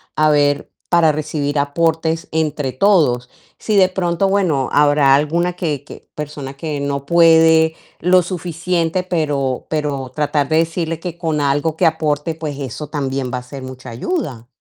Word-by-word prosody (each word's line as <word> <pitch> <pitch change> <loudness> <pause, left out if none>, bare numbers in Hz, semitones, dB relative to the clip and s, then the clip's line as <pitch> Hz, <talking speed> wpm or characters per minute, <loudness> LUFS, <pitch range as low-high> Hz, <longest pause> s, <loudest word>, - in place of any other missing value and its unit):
a 155 0 +3
ver, 145 -1 +1 0.2
para 170 -3 +4
recibir 150 -1 -2
aportes 160 +2 0
entre 150 -4 -1
todos". 130 -8 +2 0.3
Si 215 -2 0
de 185 -1 +6
pronto, 185 0 0
bueno, 175 -9 +1
habrá 145 -2 +5
alguna 170 +5 0
que 155 -6 -3
que - - -13
persona 145 -2 -6
que 150 -1 -4
no 140 -1 -3
puede 160 -1 +5 0.2
lo 180 +2 +4
suficiente, 175 0 -2
pero 145 -7 -1
pero 145 -4 -2
tratar 150 -1 0
de 155 - +2
decirle 165 0 -1
que 175 -1 -6
con 160 -3 -1
algo 145 +3 0
que - - +2
aporte, 155 0 -1
pues, 150 -3 -5
eso 140 +3 -5
también 135 -4 -3
va - - 0
a 125 - -12
ser 135 0 -9
mucha 130 0 -9
ayuda. 125 - -4
155 Hz, 160 wpm, -18 LUFS, 140-165 Hz, 0.3 s, de